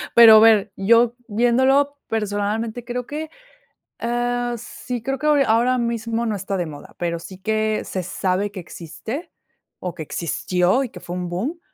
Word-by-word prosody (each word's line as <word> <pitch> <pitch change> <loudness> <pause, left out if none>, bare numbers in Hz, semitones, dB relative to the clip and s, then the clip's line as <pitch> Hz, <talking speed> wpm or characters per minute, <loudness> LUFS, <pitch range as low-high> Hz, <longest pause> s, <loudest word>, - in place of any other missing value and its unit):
Pero 225 -2 +10
ver, 215 -3 +5
yo 230 +4 +4
viéndolo 260 +6 +2
personalmente, 220 +2 -2
creo 245 +1 -4
que, 305 +3 -5 0.7
ah, 240 0 -1
sí, 245 +1 -6
creo 270 +4 -2
que 300 - -6
hora 290 -2 +4
ahora 240 +3 +3
mismo 230 0 -1
no 215 - -1
está 195 0 -3
de 175 -3 -2
moda, 145 -2 -11
pero 170 -1 -1
sí 185 +2 -10
que 215 +2 0
se 185 - -3
sabe 190 +2 -1
que 200 - -7
existe 185 - -7 0.5
o 180 -1 -5
que 160 - -5
existió 180 - 0
y 255 - -5
que - - -11
fue 175 - -7
un 180 -1 -3
boom, 240 - -3
225 Hz, 170 wpm, -22 LUFS, 195-245 Hz, 0.7 s, Pero